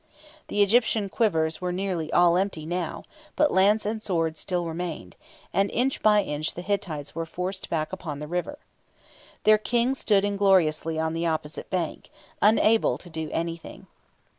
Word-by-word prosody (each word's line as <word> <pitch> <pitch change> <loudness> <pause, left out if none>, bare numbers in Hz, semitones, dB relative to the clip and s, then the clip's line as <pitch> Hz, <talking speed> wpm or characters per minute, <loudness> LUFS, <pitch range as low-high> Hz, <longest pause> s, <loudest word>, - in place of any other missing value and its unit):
The 205 - +3
Egyptian 215 -1 +2
quivers 160 -8 0
were 180 0 -1
nearly 180 -4 -2
all 175 -1 +5
empty 185 -4 -1
now; 175 0 -3 0.3
but 300 -1 +3
lance 205 +3 +4
and 215 +1 -2
sword 165 -6 -1
still 175 +1 -2
remained, 165 0 -5 0.4
and 200 +1 +2
inch 260 +3 0
by 210 -1 +5
inch 150 -2 -3
the 175 - -6
Hittites 180 -7 -3
were 165 0 -4
forced 185 +3 -5
back 155 +1 -2
upon 160 -6 -5
the 150 - -6
river. 180 - -3 0.9
Their 215 0 +6
King 240 +4 +1
stood 205 -6 +2
ingloriously 185 -6 +2
on 160 0 -1
the 165 +1 -1
opposite 155 -1 -3
bank, 180 -4 -3 0.3
unable 220 +1 +4
to 175 - -13
do 160 -1 -4
anything. 165 0 -5
180 Hz, 160 wpm, -26 LUFS, 160-205 Hz, 0.9 s, Their